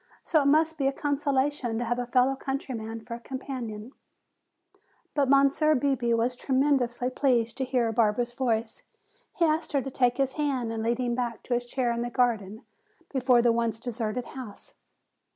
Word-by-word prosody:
"So 315 -3 +3
it - - -1
must 315 +2 +3
be 270 - +2
a - - +3
consolation 275 -4 0
to 240 - -2
have 240 +1 -1
a 245 - -3
fellow 255 +2 +3
countryman 245 -5 -4
for 235 +2 -8
a 235 - -5
companion." 245 -3 -6 1.2
But 280 -3 +1
Monsieur 280 +3 +4
Bebé 250 -4 +1
was 240 +2 0
tremendously 260 -2 +1
pleased 245 -4 +1
to 265 - -1
hear 250 -3 +1
Barbara's 230 +2 +1
voice. 230 -3 -1 0.5
He 340 - +3
asked 315 0 0
her 280 - +2
to 270 - -5
take 245 -1 +2
his 270 -1 +1
hand 265 -6 -1
and 225 - -3
lead 230 +2 0
him 245 -2 -1
back 235 -2 -3
to 250 - -2
his 240 0 -1
chair 245 -1 0
in 235 0 -2
the 240 - -2
garden 225 -4 0 0.5
before 250 -2 +4
the 240 - +5
once 230 -1 -1
deserted 235 0 -3
house. 245 -7 -10
250 Hz, 180 wpm, -27 LUFS, 235-270 Hz, 1.2 s, the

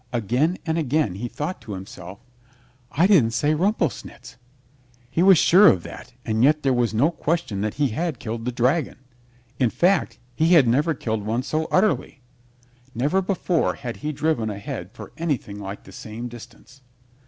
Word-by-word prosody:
Again 125 - 0
and 160 0 0
again 145 - 0
he 110 +6 -5
thought 150 +8 -5
to 110 -3 -8
himself, 95 0 -9 0.7
"I 165 +5 +3
didn't 140 - +4
say 145 +6 +2
'Rumplesnitz'!" 175 - -2 0.8
He 165 - 0
was 190 -1 +7
sure 185 +6 +6
of 90 -3 +4
that - - -10
and 110 +1 +1
yet 150 +2 +3
there 135 -2 +2
was 120 -2 +1
no 130 +10 +2
question 160 - -2
that 105 0 -2
he 145 -2 +1
had 160 +5 -2
killed 115 0 -5
the 125 - -1
dragon. 125 +6 0 0.6
In 125 -3 +3
fact, 180 - +1 0.2
he 160 +7 +2
had 140 -7 +6
never 150 +7 +2
killed 110 -2 -3
one 115 +4 -1
so 155 +3 -1
utterly. 185 -6 0 0.8
Never 145 +11 +1
before 180 -3 0
had 120 -3 -6
he 150 +1 -4
driven 150 -7 -1
a 100 - -5
head 90 -3 -6
for - - -11
anything 140 -11 -3
like 100 0 -7
the 95 - -14
same 110 +5 -7
distance. 120 +2 -13
130 Hz, 175 wpm, -23 LUFS, 115-160 Hz, 0.8 s, was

